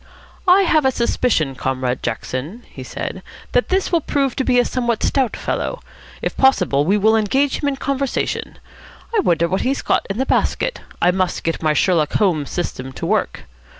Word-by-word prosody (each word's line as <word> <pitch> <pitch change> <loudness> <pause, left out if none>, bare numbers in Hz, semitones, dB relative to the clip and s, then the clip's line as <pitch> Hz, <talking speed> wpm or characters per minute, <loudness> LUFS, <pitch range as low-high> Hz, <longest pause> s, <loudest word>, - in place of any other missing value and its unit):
"I 375 +2 +6
have 315 -4 +3
a 265 - +4
suspicion, 235 - 0
Comrade 130 -1 -2
Jackson," 135 - -4
he - - -11
said, - - -5 0.3
"that - - +1
this 380 0 +1
will 340 -2 +3
prove 275 -3 0
to 265 - +1
be 250 -1 +2
a 245 - +4
somewhat 240 -3 -1
stout 265 -4 +1
fellow. - - -3 0.4
If - - -2
possible, 180 - +3
we 195 +5 +3
will 220 +2 +4
engage 265 +6 +1
him 285 - +1
in 275 - -2
conversation. 275 0 -2 0.6
I - - +4
wonder 170 - +2
what 190 +3 -1
he's 270 +2 -1
got - - +1
in 195 - -3
the 265 - 0
basket. - - 0 0.2
I 175 - +5
must 185 -1 -1
get 165 - -2
my 155 -1 +2
Sherlock 155 -1 +2
Holmes 165 -9 +1
system 130 -6 -4
to - - -5
work. - - -1
220 Hz, 185 wpm, -20 LUFS, 165-270 Hz, 0.6 s, I